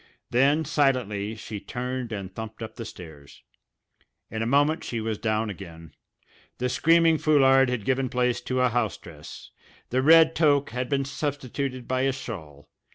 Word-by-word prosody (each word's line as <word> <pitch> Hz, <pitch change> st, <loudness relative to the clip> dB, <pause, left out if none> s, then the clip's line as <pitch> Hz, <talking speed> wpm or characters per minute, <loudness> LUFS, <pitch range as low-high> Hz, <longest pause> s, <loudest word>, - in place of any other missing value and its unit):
Then 140 Hz, +6 st, +3 dB
silently 125 Hz, -8 st, 0 dB
she 105 Hz, -1 st, -7 dB
turned 125 Hz, +1 st, -5 dB
and 95 Hz, -3 st, -6 dB
thumped 110 Hz, +1 st, -7 dB
up 110 Hz, -, -7 dB
the 115 Hz, -, -7 dB
stairs. 80 Hz, -8 st, -12 dB, 0.9 s
In 110 Hz, -, -3 dB
a 115 Hz, -, -1 dB
moment 145 Hz, +5 st, +2 dB
she 115 Hz, -, -4 dB
was 110 Hz, -1 st, -3 dB
down 110 Hz, -1 st, -1 dB
again; 85 Hz, -5 st, -11 dB, 0.6 s
the 125 Hz, 0 st, -1 dB
screaming 165 Hz, +3 st, +4 dB
foulard 135 Hz, -3 st, +4 dB
had 120 Hz, -5 st, -3 dB
given 130 Hz, -1 st, 0 dB
place 125 Hz, 0 st, 0 dB
to 130 Hz, 0 st, -1 dB
a 125 Hz, -, +3 dB
house 115 Hz, -3 st, -1 dB
dress; 75 Hz, -3 st, -12 dB, 0.4 s
the 130 Hz, +1 st, +2 dB
red 160 Hz, +2 st, +6 dB
toque 145 Hz, -5 st, +2 dB
had 125 Hz, +1 st, -3 dB
been 140 Hz, -1 st, 0 dB
substituted 135 Hz, -2 st, -4 dB
by 130 Hz, 0 st, 0 dB
a 135 Hz, 0 st, +1 dB
shawl. 80 Hz, -, -9 dB
125 Hz, 160 wpm, -25 LUFS, 110-140 Hz, 0.9 s, red